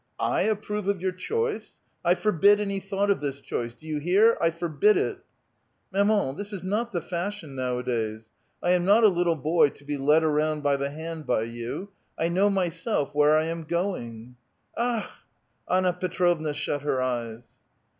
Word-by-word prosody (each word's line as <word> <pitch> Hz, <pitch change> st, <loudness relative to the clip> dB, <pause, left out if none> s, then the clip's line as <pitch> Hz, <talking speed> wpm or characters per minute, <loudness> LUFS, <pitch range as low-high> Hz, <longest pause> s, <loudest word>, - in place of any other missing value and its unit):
'/ -, -, -46 dB
ap 215 Hz, -1 st, +1 dB
prove 210 Hz, -2 st, -3 dB
of 200 Hz, -2 st, +1 dB
your 185 Hz, +1 st, -1 dB
choice*! 455 Hz, -, -3 dB, 0.3 s
I 175 Hz, +1 st, +4 dB
forbid 205 Hz, 0 st, +4 dB
any 200 Hz, -1 st, -1 dB
thought 195 Hz, +1 st, 0 dB
of 195 Hz, -, 0 dB
this 140 Hz, -1 st, -3 dB
choice 120 Hz, -3 st, -4 dB
1 -, -, -31 dB
Do 155 Hz, 0 st, -6 dB
vou 150 Hz, -1 st, -3 dB
hear? 205 Hz, +7 st, +5 dB
I 165 Hz, -, +4 dB
forbid 170 Hz, +4 st, +2 dB
it! -, -, -1 dB, 0.3 s
" -, -, -46 dB
" -, -, -40 dB
Mamauy 200 Hz, -8 st, +2 dB
this 205 Hz, +1 st, -4 dB
is 195 Hz, -4 st, -6 dB
not 215 Hz, +5 st, -1 dB
the 175 Hz, -, -2 dB
fashion 175 Hz, -3 st, -4 dB
nowadays; 120 Hz, -4 st, -2 dB, 0.3 s
I 175 Hz, -, +3 dB
am 180 Hz, -1 st, +3 dB
not 205 Hz, +5 st, +5 dB
a 215 Hz, -, +8 dB
little 175 Hz, -2 st, +1 dB
boy 155 Hz, +1 st, +3 dB
to 140 Hz, -, -17 dB
])e 145 Hz, -1 st, -2 dB
lead 150 Hz, +4 st, +4 dB
around 155 Hz, 0 st, +1 dB
by 145 Hz, -1 st, +3 dB
the 140 Hz, 0 st, -2 dB
hand 160 Hz, 0 st, -7 dB
by 110 Hz, -, +1 dB
you. 120 Hz, -, -5 dB, 0.3 s
I 165 Hz, -, 0 dB
know 190 Hz, +4 st, +3 dB
myself 180 Hz, -, -1 dB
where 150 Hz, +1 st, +4 dB
I 155 Hz, -, +2 dB
am 165 Hz, 0 st, -4 dB
going." 125 Hz, -, -4 dB, 0.2 s
'* -, -, -40 dB
Akh! 235 Hz, -2 st, -1 dB, 0.3 s
" -, -, -32 dB
Anna 185 Hz, 0 st, +3 dB
Tetrovna 175 Hz, -4 st, 0 dB
shut 145 Hz, -1 st, -2 dB
her 140 Hz, -2 st, 0 dB
eyes. 120 Hz, -2 st, -3 dB
170 Hz, 195 wpm, -26 LUFS, 145-200 Hz, 0.3 s, a